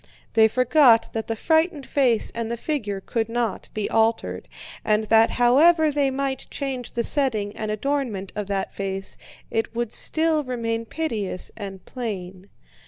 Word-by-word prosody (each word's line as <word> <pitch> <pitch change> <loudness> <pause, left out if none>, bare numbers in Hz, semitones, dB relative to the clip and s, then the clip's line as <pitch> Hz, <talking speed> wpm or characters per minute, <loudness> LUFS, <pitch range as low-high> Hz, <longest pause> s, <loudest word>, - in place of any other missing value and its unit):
They 220 -1 +6
forgot 250 0 +4
that 220 -1 -3
the 225 - -1
frightened 320 +2 +1
face 255 -6 +2
and 230 -1 -3
the 235 - -2
figure 220 -9 -3
could 225 +2 -2
not 230 -4 -2
be 215 -1 -2
altered, 225 0 0 0.4
and 215 0 +2
that 225 +1 +5
however 305 +6 +5
they 285 -1 +2
might 265 0 -3
change 265 -4 -4
the 235 - 0
setting 220 -7 0
and 215 - -4
adornment 215 -4 -2
of 210 -2 -3
that 195 -1 -2
face, 195 -1 -4 0.4
it 225 +1 -1
would 235 -2 -2
still 315 -1 +1
remain 230 -3 -2
piteous 220 - -3
and 195 -3 -8
plain. 195 -6 -6
230 Hz, 155 wpm, -24 LUFS, 215-275 Hz, 0.4 s, They